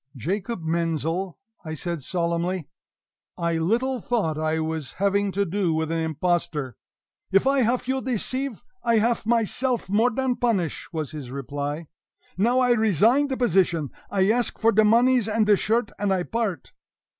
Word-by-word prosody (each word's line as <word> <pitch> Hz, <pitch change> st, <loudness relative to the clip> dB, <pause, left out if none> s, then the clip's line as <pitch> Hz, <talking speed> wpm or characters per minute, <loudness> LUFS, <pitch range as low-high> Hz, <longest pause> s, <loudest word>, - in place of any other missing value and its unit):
"Jacob 185 Hz, -, -3 dB
Menzel!" 165 Hz, +2 st, -1 dB, 0.4 s
said 170 Hz, +3 st, -3 dB
I -, -, -14 dB
solemnly, 170 Hz, +2 st, -1 dB, 0.7 s
"I 170 Hz, -2 st, 0 dB
little 240 Hz, +8 st, 0 dB
thought 200 Hz, -11 st, 0 dB
I 155 Hz, +1 st, -1 dB
was 160 Hz, -2 st, -3 dB
having 200 Hz, +1 st, +1 dB
to 200 Hz, +1 st, +1 dB
do 180 Hz, -2 st, 0 dB
with 160 Hz, 0 st, -1 dB
an 165 Hz, -, 0 dB
impostor!" 160 Hz, -5 st, -1 dB, 0.6 s
"If 195 Hz, +4 st, +4 dB
I 275 Hz, +1 st, +3 dB
haf 250 Hz, +1 st, +1 dB
you 265 Hz, 0 st, 0 dB
deceive, 255 Hz, 0 st, -2 dB, 0.2 s
I 235 Hz, -1 st, +3 dB
haf 230 Hz, 0 st, +1 dB
myself 235 Hz, -1 st, 0 dB
more 225 Hz, +4 st, +4 dB
dan 255 Hz, +1 st, -1 dB
punish!" 200 Hz, -10 st, -1 dB
was 155 Hz, -4 st, -3 dB
his 145 Hz, -5 st, -7 dB
reply. 145 Hz, +4 st, -4 dB, 0.5 s
"Now 235 Hz, +7 st, +2 dB
I 250 Hz, -1 st, +3 dB
resign 225 Hz, -, +3 dB
de 265 Hz, -2 st, -3 dB
position. 180 Hz, -, +1 dB, 0.2 s
I 195 Hz, +1 st, +2 dB
ask 240 Hz, +1 st, 0 dB
for 230 Hz, 0 st, +3 dB
de 215 Hz, 0 st, +4 dB
moneys 235 Hz, +1 st, +4 dB
and 220 Hz, 0 st, +2 dB
de 210 Hz, 0 st, +5 dB
shirt, 220 Hz, +2 st, 0 dB
and 205 Hz, -1 st, 0 dB
I 185 Hz, -2 st, +1 dB
part!" 210 Hz, -, -3 dB
195 Hz, 160 wpm, -24 LUFS, 165-235 Hz, 0.7 s, de